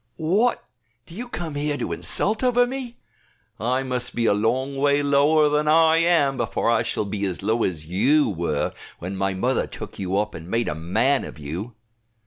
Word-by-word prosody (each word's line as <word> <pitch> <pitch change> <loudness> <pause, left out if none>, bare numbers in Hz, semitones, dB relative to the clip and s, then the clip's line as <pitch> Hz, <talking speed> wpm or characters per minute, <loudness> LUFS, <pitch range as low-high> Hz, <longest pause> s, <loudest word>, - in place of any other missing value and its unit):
"What, 200 +10 +1 0.4
do - - -14
you 240 +7 -6
come 165 -8 -5
here 145 0 -1
to - - -4
insult 215 +4 +2
over 245 -1 +4
me? 250 -1 -6 0.6
I 125 +5 0
must 125 -1 -2
be 115 - 0
a - - +4
long 130 +6 -1
way 145 +1 +2
lower 145 +2 +4
than 150 +1 +1
I 160 +1 +5
am, 165 -5 +2
before 115 -1 0
I 115 - +3
shall 105 - -1
be 100 0 -4
as 95 0 -5
low 110 +3 +1
as 80 -4 -2
you 130 - +2
were 85 -6 -2 0.2
when 90 +3 -6
my 95 0 -1
mother 125 +7 0
took - - -9
you 95 0 -1
up 105 +1 -1
and 80 +2 -9
made 115 +2 0
a - - -1
man 110 - +1
of - - -9
you." 85 +11 -6
130 Hz, 195 wpm, -23 LUFS, 100-155 Hz, 0.6 s, I